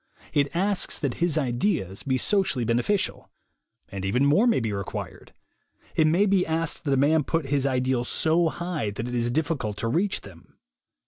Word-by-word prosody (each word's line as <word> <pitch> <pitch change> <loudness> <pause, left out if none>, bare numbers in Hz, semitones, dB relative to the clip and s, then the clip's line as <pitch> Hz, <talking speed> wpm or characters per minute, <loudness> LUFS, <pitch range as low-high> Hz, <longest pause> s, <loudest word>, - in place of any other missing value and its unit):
It 145 -1 +3
asks 195 +2 0
that 140 -5 -2
his 170 -3 +2
ideals 120 - -1
be 130 -2 0
socially 155 - +1
beneficial. 120 - 0 0.6
And 100 -1 -6
even 125 +8 +1
more 185 +12 +4
may 235 - +3
be 110 -3 -2
required. 100 -2 -6 0.6
It 155 - +4
may 175 +6 +3
be 195 -2 +3
asked 165 -1 -2
that 140 - +1
a - - +1
man 150 +3 +3
put 160 +3 -1
his 140 -1 +1
ideals 130 -2 0
so 165 +1 +2
high 170 -9 -3
that 110 +4 -5
it 125 - -5
is 120 -1 0
difficult 135 -7 -1
to 115 - -2
reach 180 - 0
them. 90 -5 -16
140 Hz, 180 wpm, -25 LUFS, 120-170 Hz, 0.6 s, more